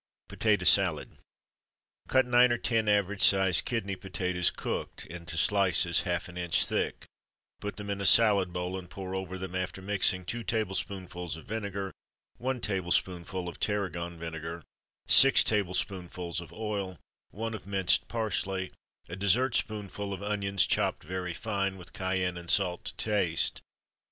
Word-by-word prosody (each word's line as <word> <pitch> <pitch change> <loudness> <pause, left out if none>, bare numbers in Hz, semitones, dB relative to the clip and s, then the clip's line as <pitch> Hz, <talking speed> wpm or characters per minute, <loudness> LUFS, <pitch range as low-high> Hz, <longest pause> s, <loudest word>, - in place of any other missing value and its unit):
Potato 105 -4 +1
Salad. 90 -3 +3 0.9
Cut 130 -1 +3
nine 125 0 +5
or 120 - +2
ten 115 -2 0
average 100 -1 +1
sized 95 -3 +5
kidney 110 -5 -2
potatoes 90 -2 -1
(cooked) - - -5
into 85 +1 -6
slices, 90 -3 +3
half 85 -3 -2
an 90 0 -10
inch 85 -1 +2
thick, - - -2 0.5
put 105 0 -5
them 105 -1 -5
in 100 0 -3
a - - -2
salad 100 -5 +6
bowl, 90 +1 -3
and 90 -1 -12
pour 95 -1 -7
over 95 -1 -4
them, 95 -1 -6
after 95 +1 -3
mixing, 95 -1 0
two 120 +5 -4
tablespoonfuls 95 -6 -3
of 80 - -12
vinegar, 100 -3 -4 0.5
one 130 +1 -2
tablespoonful 90 -2 -1
of 85 - -7
tarragon 90 -5 -2
vinegar, 80 0 -6 0.4
six 135 0 +7
tablespoonfuls 90 -3 -2
of 85 -2 -12
oil, 100 -3 -4 0.3
one 115 +3 -4
of 100 -4 -8
minced 95 -3 +2
parsley, 100 -4 -2 0.4
a 85 - -6
dessert 115 +7 +2
spoonful 105 -1 -2
of 100 +1 -6
onions 100 -2 +1
chopped - - 0
very 90 +1 -4
fine, 100 -3 -2
with 90 0 -11
cayenne 95 -2 -1
and 85 0 -8
salt 90 -3 +2
to - - -6
taste. 100 -7 0
95 Hz, 150 wpm, -29 LUFS, 90-105 Hz, 0.9 s, six